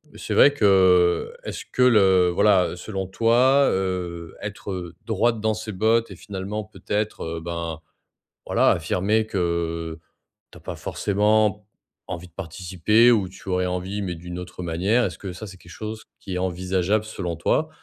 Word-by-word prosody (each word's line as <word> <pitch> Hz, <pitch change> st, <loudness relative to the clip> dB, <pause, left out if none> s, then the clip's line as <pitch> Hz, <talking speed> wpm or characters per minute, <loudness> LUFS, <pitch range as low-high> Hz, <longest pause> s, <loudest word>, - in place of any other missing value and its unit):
c'est -, -, -4 dB
vrai 145 Hz, -, +7 dB
que, 95 Hz, -, +4 dB
est-ce -, -, -6 dB
que 125 Hz, -, -1 dB
le 95 Hz, -7 st, +5 dB
voilà, 95 Hz, -1 st, +3 dB
selon 95 Hz, +1 st, -5 dB
toi, 125 Hz, +7 st, +4 dB
heu, 90 Hz, -3 st, -3 dB
être, 105 Hz, -1 st, -6 dB
heu, 85 Hz, -3 st, -6 dB
droite 115 Hz, +1 st, +1 dB
dans 110 Hz, 0 st, +1 dB
ses 110 Hz, 0 st, -6 dB
bottes 110 Hz, +2 st, +1 dB
et -, -, -8 dB
finalement 100 Hz, +2 st, -5 dB
peut-être, 105 Hz, +1 st, -3 dB
heu, 80 Hz, 0 st, -4 dB
ben, 85 Hz, -1 st, -5 dB, 0.6 s
voilà, -, -, +3 dB
affirmer 105 Hz, +4 st, +1 dB
que 85 Hz, -3 st, -2 dB, 0.5 s
tu -, -, -13 dB
as -, -, -22 dB
pas -, -, -6 dB
forcément 105 Hz, 0 st, +1 dB, 0.4 s
envie 90 Hz, -1 st, -6 dB
de 85 Hz, -, -25 dB
participer 95 Hz, +6 st, +2 dB
ou 105 Hz, -5 st, +2 dB
tu 95 Hz, -, -11 dB
aurais 90 Hz, 0 st, +1 dB
envie, 90 Hz, +3 st, -3 dB
mais 90 Hz, -2 st, -3 dB
d'une 90 Hz, +1 st, -8 dB
autre 90 Hz, 0 st, -8 dB
manière, 95 Hz, +9 st, +1 dB
est-ce 90 Hz, -3 st, -4 dB
que 95 Hz, -3 st, -6 dB
ça, 105 Hz, +4 st, -8 dB
c'est 95 Hz, -1 st, -11 dB
quelque 90 Hz, -1 st, -16 dB
chose 110 Hz, +2 st, -7 dB
qui 95 Hz, -, -6 dB
est -, -, -1 dB
envisageable 95 Hz, +3 st, 0 dB
selon 90 Hz, -6 st, -4 dB
toi? -, -, +1 dB
95 Hz, 170 wpm, -23 LUFS, 90-105 Hz, 0.6 s, vrai